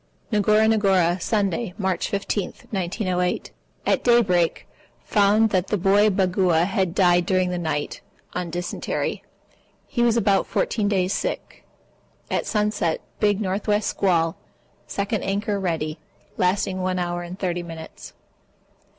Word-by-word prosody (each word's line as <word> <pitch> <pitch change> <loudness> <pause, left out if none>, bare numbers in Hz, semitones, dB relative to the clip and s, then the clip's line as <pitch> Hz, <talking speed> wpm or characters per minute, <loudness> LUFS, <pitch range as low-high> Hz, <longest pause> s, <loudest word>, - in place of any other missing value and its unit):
Ngora 215 +1 +4
Ngora, 190 -5 +3
Sunday, 200 -1 -1
March 190 -3 -1
15, 200 -1 -2 0.2
1908. 185 -2 -1 0.3
At - - +1
daybreak 195 -9 +3 0.4
found 210 +2 +3
that 185 -1 +1
the 210 - 0
boy 200 +3 +4
Bagua 185 -3 +2
had 190 -2 -1
died 175 -2 +4
during 185 -2 +2
the 180 - -2
night, 155 -3 -3 0.3
on 180 -1 -3
dysentery. 175 +1 -3 0.6
He 240 - -2
was 235 -1 +3
about 200 -3 +2
14 210 -3 0
days 190 -2 +1
sick. - - -4 0.7
At - - -1
sunset, 210 -6 0 0.2
big 205 0 +2
N.W. 205 +2 +1
squall. 170 -6 +1 0.5
(Second 200 +1 -2
anchor 200 +1 -1
ready) 160 -4 -2 0.4
Lasting 185 0 0
one 185 0 -1
hour 175 -1 -2
and 175 +1 -7
30 180 -2 -2
minutes. 165 -2 -10
190 Hz, 125 wpm, -23 LUFS, 175-205 Hz, 0.7 s, Ngora